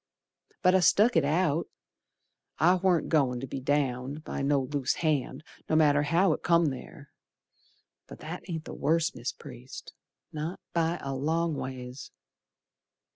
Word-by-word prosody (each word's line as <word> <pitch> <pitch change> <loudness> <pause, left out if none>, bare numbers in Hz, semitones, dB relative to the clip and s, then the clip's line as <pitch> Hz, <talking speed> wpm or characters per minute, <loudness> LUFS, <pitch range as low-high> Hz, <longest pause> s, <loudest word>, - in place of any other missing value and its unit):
But 185 0 +5
I 190 - +5
stuck 205 +6 +4
it 165 - +4
out, 160 +2 +1 0.9
I 175 +3 +5
warn't 185 -2 +2
goin' 135 -6 +2
to 135 - -5
be 135 - -5
downed 135 +1 -1
By - - -4
no 140 0 +2
loose 135 0 -1
hand, 150 -3 -1 0.3
no 155 - +2
matter 145 -2 +4
how 165 +4 +3
it - - -5
come 170 -3 +3
ther 140 +2 -10 1.0
But - - -10
that 165 +4 -6
ain't 160 -2 -4
the - - -7
worst, 160 +3 +1
Mis' - - -3
Priest, - - -11 0.4
Not 155 +4 -4
by 170 0 +1
a 135 - -3
long 160 +5 0
ways. 130 -1 -7
155 Hz, 150 wpm, -28 LUFS, 135-170 Hz, 1.0 s, But